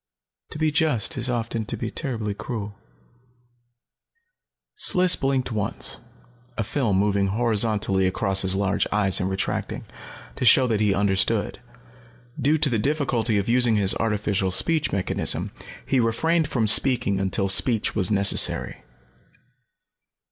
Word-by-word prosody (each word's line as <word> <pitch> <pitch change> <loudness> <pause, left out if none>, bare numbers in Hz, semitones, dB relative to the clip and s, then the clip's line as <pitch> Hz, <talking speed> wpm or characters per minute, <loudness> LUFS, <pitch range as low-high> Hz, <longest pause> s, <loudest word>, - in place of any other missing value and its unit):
To - - -8
be 155 0 0
just 150 -8 -1
is 125 -1 -3
often 115 -2 -3
to - - -4
be - - -5
terribly 115 -8 -4
cruel." 105 -1 -7 2.0
Sliss 180 0 +4
blinked, 135 -2 -2
once, 105 -3 -4 0.6
a 115 - -1
film 105 -3 -1
moving 100 0 0
horizontally 105 -3 +1
across 95 +1 0
his 95 0 +3
large 100 0 -1
eyes 100 -3 +2
and 90 - -2
retracting, 95 0 -4 0.5
to - - -4
show 125 +2 +5
that 115 -4 -1
he 105 -2 +1
understood. 100 +2 -1 0.8
Due 150 +5 +2
to 150 -1 +1
the 115 - 0
difficulty 125 -5 -1
of 100 - -2
using 120 -1 +3
his 100 -2 +3
artificial 105 -3 -1
speech 155 - 0
mechanism, 95 -1 -2 0.3
he 135 - 0
refrained 155 +8 0
from 120 -6 -1
speaking 115 -3 +2
until 95 0 -1
speech 110 +3 +2
was 95 -3 +2
necessary. 100 -1 +3
110 Hz, 135 wpm, -23 LUFS, 100-125 Hz, 2.0 s, show